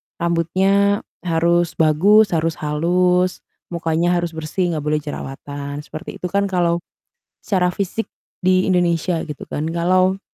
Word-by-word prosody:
rambutnya 190 +4 +1 0.2
harus 170 0 +1
bagus, 195 +7 +4
harus 165 -1 0
halus, 180 +4 +1 0.2
mukanya 170 +1 0
harus 175 -1 -1
bersih 160 +3 -2
nggak 155 -3 -3
boleh 150 0 +2
jerawatan, 145 0 -6
seperti 155 0 -8
itu 180 - -1
kan 200 0 +1
kalau 175 -2 +1 0.6
secara 180 -3 +1
fisik 200 +4 -2 0.4
di 185 +1 +3
Indonesia 175 -2 +1
gitu 150 -4 -8
kan. 150 - -3
Kalau 185 +3 +2
170 Hz, 130 wpm, -20 LUFS, 160-185 Hz, 0.6 s, bagus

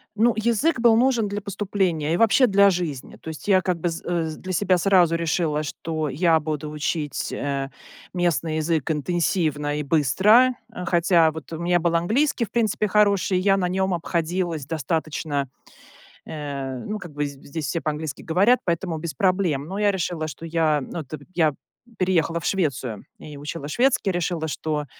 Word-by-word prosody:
Ну 230 +2 +3
язык 235 +7 +1
был 230 -2 +5
нужен 240 -4 +2
для 205 +1 -3
поступления 190 -6 -1
и - - +1
вообще 230 +5 +5
для 200 -3 +5
жизни. 165 -8 -3
То - - -9
есть 160 +4 -8
я 190 -2 +5
как 180 -2 -1
бы 175 - -1
з 165 - -6
э, 170 -2 -1
для 185 - -7
себя 185 0 +2
сразу 175 -2 +4
решила, 160 -2 0
что 155 0 -3
я 165 +4 +3
буду 150 -1 -4
учить, 150 -1 -3
э, 140 -1 -3 0.4
местный 170 -3 0
язык 160 -1 0
интенсивно 155 -2 0
и 150 - -2
быстро. 190 - +4 0.4
Хотя 170 -2 +3
вот 160 +1 -9
у 160 - -5
меня 175 +1 +2
был 170 0 +1
английский, 235 - +1
в 215 - -20
принципе, 220 -2 +1
хороший, 200 -2 +3
я 195 +1 +3
на 180 -2 0
нём 190 0 0
обходилась 170 -2 -2
достаточно,- 150 -2 -2 0.8
э, 140 -4 -5
ну, 215 0 -3
как 175 -6 -10
бы, 145 0 -2
быз 145 - -3
здесь 140 +2 -6
все 165 - -2
по-английски 155 -1 -4
говорят,- 200 +10 +3
поэтому 170 -1 -1
без 160 0 -4
проблем. 185 -8 +1
Но 195 - -4
я 210 -1 +3
решила, 170 -4 -2
что 160 +3 -8
я- 160 -2 +1
ну, 160 +5 -6
так 145 +2 -8
как 145 - -17
я 155 -4 +3 0.5
переехала 170 -3 +1
в 170 - -10
Швецию 135 - -1
и 150 -1 -10
учила 145 0 -6
шведский- 245 - +2
решила, 175 -2 -2
что, 150 +1 -2
170 Hz, 180 wpm, -23 LUFS, 150-190 Hz, 0.8 s, был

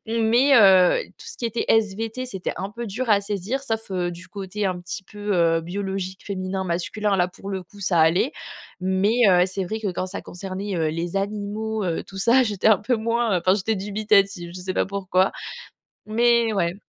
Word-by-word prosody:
mais 230 +5 +3
heu, 190 - +6
tout - - -13
ce 460 - -9
qui 240 - -1
était 230 0 -2
SVT, 225 +3 0
c'était 190 -7 -4
un 195 - -3
peu 235 +3 -6
dur 230 +5 -4
à 205 -2 +4
saisir 205 +6 -3
sauf, 225 -5 -3
heu, 180 -2 -1
du 175 +1 -11
côté 200 +1 -4
un 185 -1 -2
petit 175 +2 -6
peu, 205 +1 -4
heu, 165 -2 +3
biologique 190 +4 -4 0.4
féminin-masculin, 190 +1 -2
là, 180 -1 +2
pour 195 +2 -11
le 190 -1 -3
coup, 190 +4 -18
ça 180 -3 +2
allait. 170 - +3 0.5
Mais 190 +5 +1
heu, 180 -1 +5
c'est 190 +1 -3
vrai 215 +5 -4
que 205 -4 -2
quand 185 - -3
ça 185 - -5
concernait, 195 +2 -5
heu, 160 -2 +1
les 170 +3 -3
animaux, 210 +2 -2
heu, 170 -3 -1
tout 195 - -13
ça, 235 +6 +4
j'étais 210 -5 -1
un 215 -3 +6
peu 240 +5 0
moins, 230 -2 +1
heu, - - 0
enfin 185 +2 +3
j'étais 215 +2 -1
dubitative, 200 -3 +1
je 185 - -7
sais 185 +1 -4
pas - - +2
pourquoi, 190 -1 +1 0.8
mais 235 +1 +3
ouais. 175 -4 0
200 Hz, 205 wpm, -23 LUFS, 185-220 Hz, 0.8 s, heu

